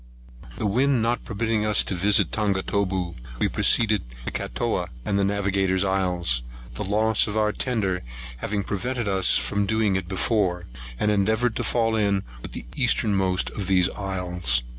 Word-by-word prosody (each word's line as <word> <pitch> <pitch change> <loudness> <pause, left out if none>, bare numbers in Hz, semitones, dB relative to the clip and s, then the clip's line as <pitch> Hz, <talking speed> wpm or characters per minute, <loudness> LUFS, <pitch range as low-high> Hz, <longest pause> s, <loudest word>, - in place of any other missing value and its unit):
THE - - -2
wind 125 +3 +2
not 120 +1 0
permitting 110 0 -1
us 105 -1 +2
to - - -3
visit 100 +3 +3
Tongataboo, 95 -3 0 0.2
we - - +2
proceeded 110 -4 +3 0.2
to - - -3
Catooa - - -2 0.2
and 100 - 0
Navigator's 100 -1 +1
Isles, 90 -9 +1 0.3
the - - -4
loss 110 +1 +2
of 105 +1 -3
our 105 -1 +2
tender 105 -7 -1 0.4
having 100 +9 -2
prevented 120 +4 -2
us 95 -2 +3
from 100 +12 -1
doing 110 -2 +1
it 95 -2 -2
before, 95 -2 0 0.3
and 105 - +2
endeavoured 110 +3 +1
to - - -1
fall 115 -2 +1
in 100 -3 +1 0.2
with - - -8
the - - -6
eastermost 95 -3 +1
of 100 -3 -4
these 95 -1 +3
islands. 90 -10 0
100 Hz, 155 wpm, -24 LUFS, 95-110 Hz, 0.4 s, visit